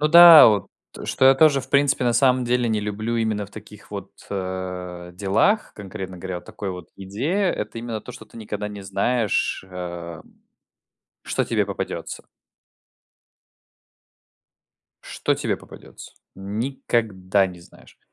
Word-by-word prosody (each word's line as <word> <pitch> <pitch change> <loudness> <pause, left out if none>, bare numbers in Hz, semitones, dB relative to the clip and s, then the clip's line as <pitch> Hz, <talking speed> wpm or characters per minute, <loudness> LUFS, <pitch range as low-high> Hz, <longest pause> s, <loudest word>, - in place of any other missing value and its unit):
Ну 150 - +2
да, 170 -1 +10
вот 105 -4 +1 0.4
что 130 - 0
я 135 0 +8
тоже, 145 -1 +4
в - - -13
принципе, 140 -2 +3
на 120 - +2
самом 130 0 +3
деле 120 0 +1
не 110 -1 0
люблю 110 +3 -3
именно 110 -3 -1
в - - -20
таких 105 -1 -13
вот, 100 -2 -7 0.2
э, 90 -2 -5
делах, 105 - +1
конкретно 95 -2 -8
говоря, 90 -1 -5
такой 100 +1 -7
вот 90 -2 -8
идее- 140 - -1
это 105 +2 -5
именно 115 -2 -5
то, 125 - -9
что 125 - -11
ты - - -17
никогда 105 -1 -5
не 105 -1 -8
знаешь, 100 +1 0
э, 85 -2 -7 1.0
что - - -1
тебе - - 0
попадется. - - -5 2.8
Что - - -1
тебе - - -2
попадется? - - -13 0.2
Никогда 100 -2 -1
не 90 -1 -10
знаешь, 85 - -19
105 Hz, 140 wpm, -23 LUFS, 95-125 Hz, 2.8 s, да